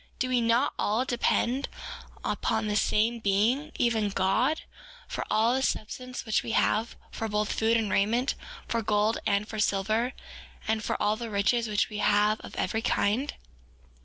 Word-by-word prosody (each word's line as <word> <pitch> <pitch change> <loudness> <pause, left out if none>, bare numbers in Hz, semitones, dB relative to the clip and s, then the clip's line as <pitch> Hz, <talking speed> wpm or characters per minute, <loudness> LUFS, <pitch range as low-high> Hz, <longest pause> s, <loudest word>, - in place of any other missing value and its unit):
Do 255 - -1
we 250 -1 +2
not 230 +3 +2
all 220 +5 +1
depend 250 +1 0 0.6
upon 220 -1 0
the 210 -1 -1
same 225 +2 +2
Being, 225 +9 +1
even 225 -3 +1
God, 195 +11 +1 0.5
for - - -3
all 225 +3 +3
the 265 - +1
substance 255 0 -3
which 220 - +1
we 230 - -4
have, 225 +2 +1 0.2
for 225 - -3
both 210 0 0
food 225 +1 +2
and 215 -4 -1
raiment, 230 +7 +2
and - - -14
for 230 - +1
gold, 210 +1 +1
and 200 +1 +1
for 220 - -6
silver, 215 +4 +1 0.5
and 220 0 0
for - - -2
all 210 +1 +1
the 235 -1 -5
riches 220 +3 +1
which 210 -1 +1
we 210 -1 -5
have 210 +1 +3
of - - -10
every 220 - -1
kind? 235 +4 0
220 Hz, 170 wpm, -28 LUFS, 210-240 Hz, 0.6 s, all